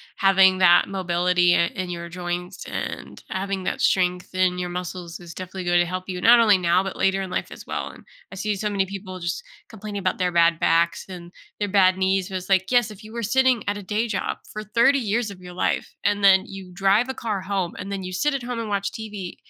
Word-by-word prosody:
having 190 -1 +5
that 175 -2 +5
mobility, 180 -1 +2
uh, 170 - +3
in 185 -2 -3
your 170 0 -6
joints 180 +1 -5
and - - -6
having 190 0 -3
that - - -2
strength 180 -1 +1
in 185 -1 +1
your 180 0 -3
muscles 180 -1 -6
is 170 -1 -11
definitely 185 0 -6
going 175 0 +3
to 175 - +3
help 185 +1 -4
you, 180 -1 -3
not 235 +4 +7
only 215 -4 +5
now, 175 0 +2
but 195 0 -5
later 195 0 +1
in 190 - -5
life - - -3
as - - -11
well - - -3
and - - -14 0.3
I - - -8
see 210 +2 -2
so 210 +2 -2
many 195 -1 0
people 190 -1 -7
just 170 0 -3 0.3
complaining 215 -2 -6
about 185 -1 -1
their 180 -1 0
bad 170 -1 +3
backs 170 +1 +2
and 175 -2 -10 0.3
their 205 - -1
bad 190 -1 +4
knees, 190 0 +1
but 190 - -4
it's, 185 +1 -8
like, 190 +1 +2
yes, 245 -3 +3
if 210 0 -12
you 215 +1 -12
were 235 - -4
sitting 255 0 +2
at 205 - -1
a 205 - -8
day 215 +5 -1
job 200 -4 -2
for 215 - -6
30 235 +6 +3
years 225 -1 -1
of 185 -2 -11
your 180 0 -10
life, 175 - -1
and 205 0 +1
then 190 0 +6
you 195 -2 -9
drive 195 +6 +3
a 265 - -3
car 215 -6 -3
home, 190 -3 -2
and 195 +2 -6
then 195 - -3
you 185 0 -6
sit 295 +9 +1
at 275 - -2
home 245 0 -4
and 225 - -4
watch 200 -1 -1
TV 210 -5 -7
190 Hz, 245 wpm, -23 LUFS, 180-205 Hz, 0.3 s, not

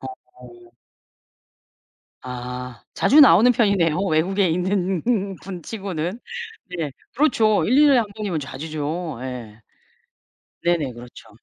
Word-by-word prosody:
어. 125 -2 -13 1.5
아. 125 -2 -7
자주 300 - +5
나오는 245 - +7
편이네요 200 -9 +2
외국에 190 +2 +1
있는 180 +1 0 0.4
분 185 -3 -8
치고는. 190 -2 -4 0.6
네. 160 -4 -3 0.2
그렇죠. 230 -7 +3
1-2 275 +6 +5
년에 275 -3 +5
1 230 - +1
번이면 200 -7 -3
자주죠. 155 +2 -5
예. 120 -4 -7 1.0
네네. 170 -6 +1
그렇죠. 120 -1 -13
170 Hz, 200 characters per minute, -22 LUFS, 130-200 Hz, 1.5 s, 나오는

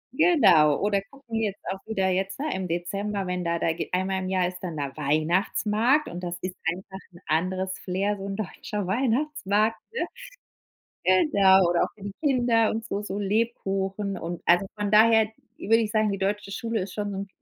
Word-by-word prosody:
Genau. 195 - +5
Oder 200 -1 +1
gucken 235 -5 -5
jetzt 205 -3 -2
auch 190 - -5
wieder 195 -4 0
jetzt, 190 +3 -1
ne, 305 +2 -1
im 190 -1 -3
Dezember, 195 +4 -2
wenn 180 0 -2
da 170 0 0
da 165 -1 0
geh - - -5
einmal 190 +1 0
im 185 - -4
Jahr 185 -1 +1
ist 180 0 -7
dann 170 -4 -5
da 140 -2 -4
Weihnachtsmarkt, 200 - +1
und 175 - -6
das 175 0 -4
ist 185 0 -4 0.2
einfach 190 +2 -8
'n 175 - -14
anderes 185 +4 -1
Flair, 195 +3 -1
so 195 - -7
'n 195 0 -4
deutscher 210 0 -4
Weihnachtsmarkt, 225 -1 +1
ne? 470 - -1 1.0
Genau. 190 - +5
Oder 175 - +3
auch - - -4
für 205 - -18
die 200 - -5
Kinder 240 -6 +3
und 225 +1 -3
so 205 -3 -3
so 205 -1 -4
Lebkuchen 200 -2 -1
und 170 0 -6
also, 175 +3 +4
von 205 -1 -2
daher 220 +1 +6 0.3
würde 225 +2 +3
ich 220 -2 0
sagen, 215 -2 +2
die 195 - -3
deutsche 200 +1 -2
Schule 225 +1 -2
ist 185 0 -7
schon 205 0 -3
so 195 - -5
'n 195 +1 -5
195 Hz, 195 wpm, -26 LUFS, 185-220 Hz, 1.0 s, daher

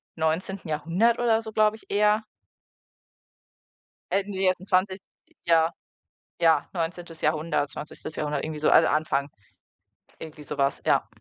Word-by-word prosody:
19. 165 +3 -2
Jahrhundert 170 +10 +1
oder 230 -2 +2
so, 220 - -7
glaube 215 0 +3
ich, - - -19
eher 210 +1 +3 1.9
äh, 195 0 +2
ne, 205 - -7
die 195 - -1
jetzt 185 -1 +2
'n 190 - -11
zwanzigst 190 0 +1 0.4
Ja, 165 -1 +4 0.7
ja, 165 -3 +4
19. 170 -1 -4
Jahrhundert 155 -1 0
20. 155 +1 -7
Jahrhundert, 150 -2 -2
irgendwie 155 -1 -5
so - - +3
alle - - +6
anfangen. 145 -2 0 0.9
Irgendwie 155 -1 -9
so 140 - -6
was, 140 0 0
ja. - - +2
165 Hz, 145 wpm, -26 LUFS, 155-195 Hz, 1.9 s, alle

